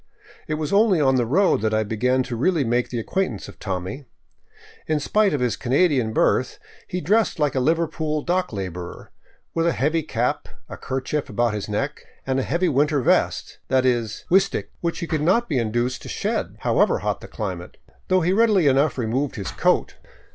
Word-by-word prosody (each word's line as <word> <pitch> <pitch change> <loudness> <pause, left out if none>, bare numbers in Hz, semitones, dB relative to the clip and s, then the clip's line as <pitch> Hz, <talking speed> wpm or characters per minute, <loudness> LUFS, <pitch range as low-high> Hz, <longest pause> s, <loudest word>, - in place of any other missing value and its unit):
It 155 - -1
was 155 +3 -3
only 200 -4 +4
on 135 -3 +3
the 120 -2 +1
road 185 - +3
that 110 0 +1
I 110 - +2
began 125 +5 0
really 145 +7 +1
to - - -4
make 120 +1 +1
the 120 - -4
acquaintance 120 - -2
of - - -13
Tommy. 95 +7 -4 0.8
In 155 -1 +1
spite 210 +7 +2
of 145 - -1
his 120 -2 +1
Canadian 130 - +2
birth - - +1 0.3
he 180 - -3
dressed 210 +8 +2
like 150 -3 +1
a 130 - 0
Liverpool 155 +1 0
dock 180 +1 0
laborer, 90 -4 -6 0.4
with 165 0 +1
a 170 - +2
heavy 155 +4 +1
cap, 125 -5 -2 0.2
a - - -7
kerchief 135 +3 -3
about 120 +1 0
his 105 0 -4
neck, 135 +8 -3 0.2
and 135 0 0
a - - +1
heavy 170 +7 0
winter 145 +1 +2
vest - - +1
— - - -45
that 130 0 +2
is, 120 -4 0
" - - -27
w'stc't 195 +2 +2
" - - -37
— - - -38
which 170 -1 -1
he - - -1
could 155 -2 -2
not 195 +10 +2
be 140 -6 0
induced 120 +3 -1
to - - -9
shed, - - -2
however - - +2
hot - - -1
the - - -9
climate, 90 -4 -6 0.3
though 185 0 +3
he 175 +3 +2
readily 210 -5 +4
enough 140 +2 +3
removed 125 +4 -1
his 100 -3 -4
coat. - - +1
135 Hz, 205 wpm, -23 LUFS, 120-165 Hz, 0.8 s, only